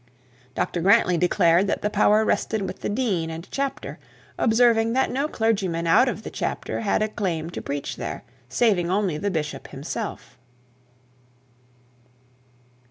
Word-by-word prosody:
Dr 175 - -1
Grantly 185 0 +4
declared 175 +1 +3
that - - -2
the 210 - +1
power 215 +1 +4
rested 220 -1 0
with 190 - -5
the - - -3
dean 205 -8 -1
and 165 +2 -7
chapter, 275 0 -4 0.4
observing 230 -1 +3
that 265 +1 +1
no 275 +4 0
clergyman 195 - 0
out 170 +10 +5
of 220 -2 -5
the - - -7
chapter - - -3
had 215 0 +1
a - - +1
claim 175 -6 -3
to - - -6
preach 140 0 -4
there, - - -5 0.3
saving 180 - +2
only 190 -5 0
the 205 - -1
bishop 155 -5 -4
himself. 150 - -6
200 Hz, 145 wpm, -24 LUFS, 170-225 Hz, 0.4 s, out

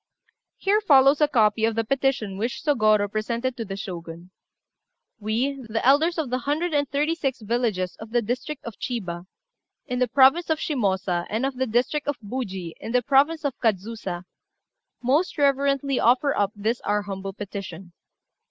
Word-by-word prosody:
Here 410 +2 +2
follows 280 -5 +5
a 300 - +6
copy 220 -5 +2
of 225 0 +2
the 225 - +1
petition 255 -5 0
which 235 +6 -3
Sôgorô 215 -8 +3
presented 235 +4 -2
to 230 - -4
the 195 -1 -5
Shogun 170 -2 -8 0.9
"We, 245 +6 -1
the 225 +1 -2
elders 310 +6 +4
of 300 -6 -2
the 255 - 0
hundred 305 +6 -1
and 285 -2 +1
thirty 295 +4 +1
six 275 -6 -2
villages 215 -5 -1
of 220 - -9
the 240 +1 +1
district 255 +6 -4
of 230 -3 -8
Chiba, 180 -8 -4 0.6
in 250 -3 -3
the 250 - +2
province 280 +7 +4
of 320 - +2
Shimôsa, 190 - -1
and 225 +5 -1
of 270 -1 -2
the 260 0 0
district 250 +7 0
of 290 -2 -1
Buji, 200 -7 -5
in 225 - -6
the 250 0 +3
province 290 +5 +3
of 280 - 0
Kadzusa, 200 -4 -2 0.8
most 295 +9 +1
reverently 275 -1 +2
offer 255 +4 +3
up 200 -1 +1
this 220 +4 -1
our 210 0 0
humble 195 -1 -6
petition. 190 -3 -8
240 Hz, 170 wpm, -24 LUFS, 205-275 Hz, 0.9 s, a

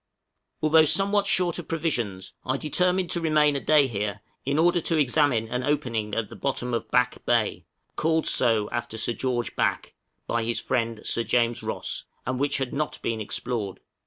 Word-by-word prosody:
Although 155 +1 +6
somewhat 200 +5 +3
short 180 -3 +2
of - - -8
provisions, 120 - -2
I 130 +1 -1
determined 180 +5 0
to 170 - -1
remain 150 -2 +3
a - - 0
day 150 0 +4
here 105 -4 -3 0.2
in 140 +2 0
order 175 +2 +3
to 165 +1 +1
examine 140 -5 +3
an 125 +2 -2
opening 115 -7 -1
at 115 -2 -1
the - - -11
Bottom 125 -3 -2
of 115 -1 -2
Back 125 +1 +1
Bay, 110 -8 +1 0.3
called 160 0 +1
so 110 -4 +3
after 120 -1 -4
Sir 115 +1 0
George 120 -3 -2
Back, - - -1 0.3
by 115 -1 -1
his 115 +1 -1
friend 115 -3 -1
Sir 115 - -1
James 120 0 +1
Ross, - - -4 0.2
and 130 0 -2
which 145 +1 +1
had 135 -2 -3
not 150 +1 -2
been 115 -1 -1
explored. 105 -2 -4
125 Hz, 180 wpm, -26 LUFS, 115-155 Hz, 0.3 s, Although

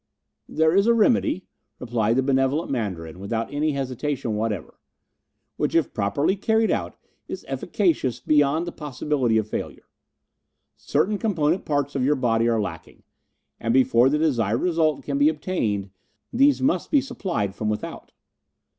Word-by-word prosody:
"There 160 +2 +2
is 200 +3 +4
a 235 - +5
remedy," 225 -4 +2 0.3
replied 115 -2 0
the 130 - +2
benevolent 135 +4 +1
Mandarin, 90 -9 -4
without 110 +5 -3
any 150 +1 0
hesitation 135 -3 -3
whatever, 105 -2 -3 0.8
"which - - -1
if 165 -5 +2
properly 120 - 0
carried 220 +3 +1
out - - -2 0.3
is - - -7
efficacious 140 - 0
beyond 150 +2 +2
the 175 - -5
possibility 140 -6 -1
of 110 -1 0
failure. - - -6 0.9
Certain 205 +1 0
component 175 -5 0
parts 145 -1 -1
of 135 - -1
your 145 +3 +3
body 115 -3 +1
are 115 -1 +1
lacking, 105 - -6 0.6
and 115 +1 0
before 130 -1 +4
the 150 - +1
desired 120 -8 +1
result 160 -4 +1
can 140 -1 -2
be 145 +2 +5
obtained 115 - -2 0.4
these 275 +2 +3
must 280 - +1
be 290 - +4
supplied 170 - -3
from 110 +1 -3
without. 105 - -5
140 Hz, 145 wpm, -24 LUFS, 115-165 Hz, 0.9 s, a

